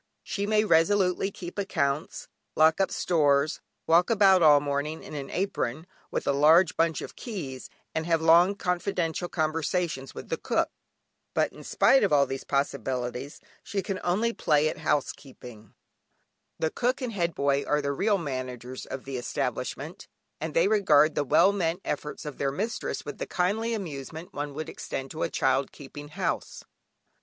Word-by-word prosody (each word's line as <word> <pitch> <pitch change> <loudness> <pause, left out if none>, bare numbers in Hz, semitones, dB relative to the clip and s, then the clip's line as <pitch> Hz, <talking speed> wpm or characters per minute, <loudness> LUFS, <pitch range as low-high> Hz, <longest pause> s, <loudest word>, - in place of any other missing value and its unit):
She 200 0 -3
may 215 0 +3
resolutely 190 +1 +3
keep 180 -1 -8
accounts, 155 -6 -2 0.3
lock 160 +4 +4
up 190 - +2
stores, 145 -3 +1 0.2
walk 170 +2 +4
about 195 -4 +5
all 150 -3 +7
morning 145 +2 -3
in - - -10
an 140 -2 -5
apron, 160 -6 -2 0.2
with - - -3
a - - +2
large 160 +5 +5
bunch 165 -1 +1
of - - -9
keys, 150 - -6 0.2
and 160 +1 -2
have 165 -1 +3
long 170 +4 +5
confidential 180 -2 -1
conversations 155 -2 -1
with - - -8
the - - -1
cook; - - 0 0.7
but - - +1
in - - -12
spite 270 - +4
of 200 - +2
all 140 -1 +5
these 135 0 -5
possibilities 135 -1 -2 0.2
she 195 -2 -3
can 195 - -3
only 215 +7 +1
play 150 -5 +2
at - - -6
housekeeping; 130 -7 -4 0.8
the 160 -1 -1
Cook 250 +2 0
and 240 -3 -3
Head 170 -4 -1
Boy 140 0 +1
are 150 - +1
the 140 -1 -1
real 205 +7 +2
managers 130 -5 -5
of 130 - -6
the 135 -1 -4
establishment, 120 - -4 0.3
and 160 0 -5
they 165 +3 +4
regard 155 -8 +4
the 145 - 0
well 155 +8 +5
meant 175 -3 -1
efforts 150 +1 -4
of 150 -3 -7
their 140 - 0
mistress 215 +9 -3
with 145 - -7
the - - -3
kindly 220 +6 0
amusement 160 -3 -7
one 145 -1 -4
would 155 +1 -4
extend 135 0 -6
to 160 - -6
a - - 0
child 135 0 +1
"keeping 145 +1 -10
house." 155 - -3
155 Hz, 165 wpm, -27 LUFS, 140-185 Hz, 0.8 s, all